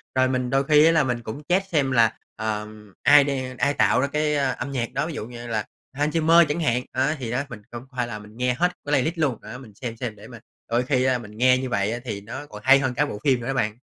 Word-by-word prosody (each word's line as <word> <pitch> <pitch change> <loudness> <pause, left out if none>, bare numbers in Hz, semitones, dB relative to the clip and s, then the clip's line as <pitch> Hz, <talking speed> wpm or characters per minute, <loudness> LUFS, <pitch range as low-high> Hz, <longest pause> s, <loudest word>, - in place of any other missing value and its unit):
Rồi 130 0 +4
mình 125 -1 -1
đôi 135 0 +2
khi 150 +2 +5
á, 165 - +6
là 160 -2 +3
mình 125 -3 -2
cũng 115 +6 -6
check 195 +2 +2
xem 140 -5 +1
là, 115 -3 +3 0.2
ờm, 105 -1 -5
ai 145 0 +7
đe 130 -2 -3
ai 140 +2 +1
tạo - - +3
ra 140 - +1
cái 150 +1 0
âm 135 -1 -1
nhạc 125 -3 -3
đó, 140 +4 -1
ví 165 - -5
dụ 110 - -5
như 120 0 -9
là 110 -2 -2 0.3
Hans 145 +4 -1
Zimmer, 165 +1 +6
chẳng 150 +3 -2
hạn. 125 -5 +1
Á, 135 +4 0
thì 120 -4 -4
đó, 125 +3 0
mình 115 -3 -9
cũng 120 0 -7
có 130 - -18
phải 125 - 0
là 105 -3 -6
mình 105 +2 -14
nghe 125 0 +1
hết 170 +8 +2 0.2
cái 145 - -4
playlist 150 +4 +1
luôn, 140 -8 0
á, - - -9
mình 120 -5 -13
xem 115 0 -6
xem 115 -3 -4
để 105 +1 -13
mà 120 -1 -11 0.3
đôi 120 +2 +1
khi, 130 0 +1
a, 130 -1 +2
mình 105 -3 -11
nghe 125 +1 +5
như 130 0 -3
vậy 100 -2 0
á, 120 - -3
thì 105 -4 -4
nó 130 +8 -7
còn 105 -7 -11
hay 135 +1 +7
hơn 130 -2 -1
cả 145 +4 +1
bộ 105 -8 -6
phim 130 -3 +3
nữa 120 - -6
ấy 135 - 0
bạn. 110 -4 -1
130 Hz, 295 wpm, -24 LUFS, 115-145 Hz, 0.3 s, ai